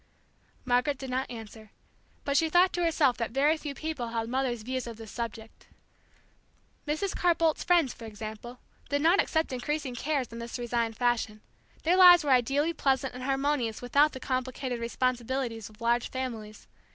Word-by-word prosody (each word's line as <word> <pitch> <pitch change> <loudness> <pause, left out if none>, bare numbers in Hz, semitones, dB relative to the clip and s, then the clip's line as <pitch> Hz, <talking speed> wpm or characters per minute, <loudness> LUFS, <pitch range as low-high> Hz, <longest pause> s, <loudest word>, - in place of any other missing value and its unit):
Margaret 250 +3 +2
did 265 -1 -7
not 260 +1 -1
answer. 220 -2 -10 0.6
But 280 - 0
she 320 +2 +3
thought 355 +3 +4
to 350 - 0
herself 305 -6 +2
that 230 - -2
very 280 +6 +3
few 295 -3 -6
people 310 -6 -4
held 230 0 -3
Mother's 250 -4 -1
views 255 +1 -3
of 230 -2 -7
this 225 -2 -10
subject. 225 -1 -7 1.2
Mrs. 310 +7 -1
Carr 350 -1 +3
Boldt's 325 -2 +1
friends, 340 -7 +3
for 230 - -11
example, 220 +3 -8 0.3
did 285 +1 0
not 345 +5 +5
accept 320 -4 -1
increasing 275 +1 -3
cares 265 -1 -2
in 230 - -7
this 235 +2 -5
resigned 235 -2 -2
fashion; 240 -3 0 0.4
their 345 +3 +3
lives 355 -2 +9
were 285 - 0
ideally 275 +6 +2
pleasant 265 -3 0
and 250 - -8
harmonious 270 -4 0
without 280 +5 +3
the 260 - -7
complicated 255 -1 -3
responsibilities 240 -1 -2
of 215 0 -19
large 235 +1 +1
families. 230 -5 -6
255 Hz, 170 wpm, -28 LUFS, 235-295 Hz, 1.2 s, lives